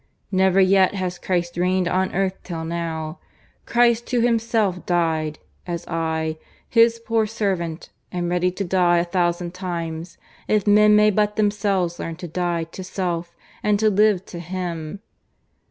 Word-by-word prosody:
Never 190 Hz, 0 st, +3 dB
yet 190 Hz, 0 st, +4 dB
has 180 Hz, -2 st, -3 dB
Christ 175 Hz, -2 st, -2 dB
reigned 180 Hz, 0 st, +1 dB
on 185 Hz, +1 st, 0 dB
earth 190 Hz, 0 st, +1 dB
till 165 Hz, -3 st, -5 dB
now 160 Hz, -1 st, -4 dB, 0.5 s
Christ 235 Hz, -1 st, +3 dB
who 245 Hz, -2 st, +1 dB
Himself 225 Hz, -5 st, +1 dB
died, 160 Hz, -3 st, 0 dB, 0.3 s
as 170 Hz, -1 st, -4 dB
I, 160 Hz, -1 st, -2 dB, 0.3 s
His 230 Hz, 0 st, +4 dB
poor 230 Hz, -1 st, 0 dB
servant, 190 Hz, -7 st, -3 dB, 0.2 s
am 175 Hz, -1 st, -2 dB
ready 180 Hz, +1 st, +1 dB
to 185 Hz, +2 st, -4 dB
die 175 Hz, -1 st, +3 dB
a 170 Hz, -, +3 dB
thousand 175 Hz, -1 st, -1 dB
times, 170 Hz, -2 st, -5 dB, 0.3 s
if 210 Hz, -2 st, +2 dB
men 210 Hz, 0 st, +6 dB
may 210 Hz, 0 st, +5 dB
but 210 Hz, +1 st, +1 dB
themselves 200 Hz, -4 st, 0 dB
learn 165 Hz, -, -4 dB
to 175 Hz, +1 st, -7 dB
die 170 Hz, 0 st, -1 dB
to 165 Hz, +3 st, -9 dB
self 175 Hz, -2 st, -3 dB, 0.3 s
and 210 Hz, -1 st, +2 dB
to 215 Hz, 0 st, +3 dB
live 205 Hz, -2 st, +3 dB
to 175 Hz, -, -8 dB
Him. 175 Hz, 0 st, -5 dB
180 Hz, 155 wpm, -22 LUFS, 170-205 Hz, 0.5 s, men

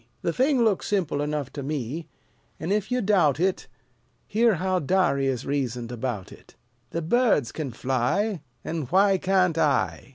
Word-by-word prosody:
The 170 Hz, -, 0 dB
thing 260 Hz, -, +3 dB
looks 205 Hz, -4 st, +1 dB
simple 175 Hz, -8 st, 0 dB
enough 150 Hz, -2 st, -3 dB
to 145 Hz, -, -5 dB
me; 145 Hz, +2 st, -4 dB, 0.5 s
And, 170 Hz, +5 st, -1 dB
if 210 Hz, +2 st, -1 dB
you 250 Hz, 0 st, +1 dB
doubt 175 Hz, -9 st, +3 dB
it, 185 Hz, +1 st, 0 dB, 0.6 s
Hear 225 Hz, 0 st, +3 dB
how 185 Hz, +2 st, 0 dB
Darius 140 Hz, -7 st, +1 dB
reasoned 125 Hz, -4 st, -2 dB
about 120 Hz, -5 st, -4 dB
it. -, -, -16 dB, 0.3 s
"The 165 Hz, -, -3 dB
birds 200 Hz, -, +2 dB
can 155 Hz, -4 st, -4 dB
fly, 135 Hz, -, 0 dB, 0.2 s
an' 160 Hz, -3 st, -3 dB
why 195 Hz, +4 st, +4 dB
can't 185 Hz, -3 st, +2 dB
I? 150 Hz, -3 st, +1 dB
165 Hz, 155 wpm, -25 LUFS, 135-195 Hz, 0.6 s, why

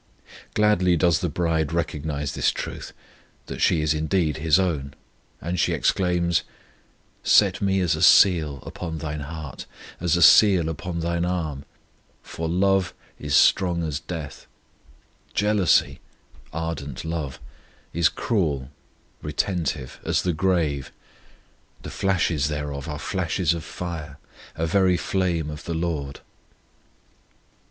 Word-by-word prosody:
Gladly 95 Hz, -5 st, +3 dB
does 85 Hz, 0 st, +3 dB
the 90 Hz, -, -1 dB
bride 80 Hz, -1 st, 0 dB
recognize 75 Hz, -3 st, -2 dB
this -, -, +2 dB
truth, -, -, -5 dB, 0.5 s
that -, -, -7 dB
she 80 Hz, -, +3 dB
is 75 Hz, 0 st, +1 dB
indeed 80 Hz, 0 st, 0 dB
His 80 Hz, +1 st, +3 dB
own, 75 Hz, -7 st, -1 dB, 0.4 s
and 85 Hz, +2 st, -3 dB
she -, -, +2 dB
exclaims: 90 Hz, -2 st, +1 dB, 0.8 s
Set -, -, +4 dB
me 95 Hz, -1 st, +1 dB
as 85 Hz, -4 st, +1 dB
a 80 Hz, -, -5 dB
seal 80 Hz, -6 st, +5 dB
upon 80 Hz, -3 st, -6 dB
Thine 75 Hz, -1 st, -4 dB
heart, 75 Hz, 0 st, -7 dB, 0.3 s
as 85 Hz, -1 st, +1 dB
a 85 Hz, -, +4 dB
seal 90 Hz, 0 st, +6 dB
upon 85 Hz, +2 st, -4 dB
Thine 85 Hz, +1 st, -1 dB
arm; 80 Hz, -6 st, -3 dB, 0.6 s
For 80 Hz, 0 st, -5 dB
love 95 Hz, +1 st, +1 dB, 0.2 s
is 75 Hz, -1 st, -1 dB
strong 90 Hz, -3 st, +4 dB
as 75 Hz, -2 st, -2 dB
death; 80 Hz, -5 st, -7 dB, 0.9 s
Jealousy 105 Hz, -3 st, +2 dB, 0.5 s
(ardent 80 Hz, -4 st, -5 dB
love) 80 Hz, -5 st, -4 dB, 0.5 s
is 85 Hz, 0 st, +3 dB
cruel 75 Hz, -, -1 dB, 0.5 s
(retentive) 75 Hz, -3 st, -2 dB
as -, -, 0 dB
the 90 Hz, -, 0 dB
grave; 80 Hz, -6 st, 0 dB, 0.9 s
The -, -, -7 dB
flashes 85 Hz, -6 st, +1 dB
thereof 75 Hz, -1 st, -4 dB
are 75 Hz, -, -4 dB
flashes 85 Hz, +1 st, -1 dB
of 85 Hz, -1 st, -5 dB
fire, 80 Hz, -5 st, -6 dB, 0.4 s
A 80 Hz, -, -1 dB
very 90 Hz, +1 st, +3 dB
flame 85 Hz, -6 st, -1 dB
of 75 Hz, -, -9 dB
the 85 Hz, -, -3 dB
LORD. 80 Hz, -5 st, -3 dB
80 Hz, 125 wpm, -24 LUFS, 75-90 Hz, 0.9 s, seal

